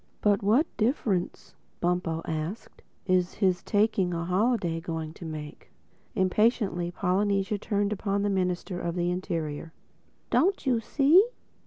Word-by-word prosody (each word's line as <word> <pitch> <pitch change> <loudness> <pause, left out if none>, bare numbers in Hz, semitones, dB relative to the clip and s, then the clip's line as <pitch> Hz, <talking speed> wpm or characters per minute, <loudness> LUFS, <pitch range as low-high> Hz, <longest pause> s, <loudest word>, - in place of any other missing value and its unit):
"But 205 -2 +3
what 220 +10 +4
difference," 215 -6 -1 0.3
Bumpo 175 -2 -1
asked, 160 +7 -5 0.2
"is 185 -2 +1
his 185 -3 +1
taking 205 -4 +1
a 170 0 -2
holiday 185 -2 +1
going 160 -2 -4
to 170 - -10
make?" 155 -2 -8 0.5
Impatiently 190 -2 +1
Polynesia 195 +3 0
turned 205 0 0
upon 200 0 -1
the 205 - +1
Minister 180 -1 -1
of 170 -1 -3
the 175 0 0
Interior. 165 -3 -4 0.6
"Don't 385 -1 +2
you 250 -3 +2
see? 295 - +5
185 Hz, 130 wpm, -27 LUFS, 175-210 Hz, 0.6 s, see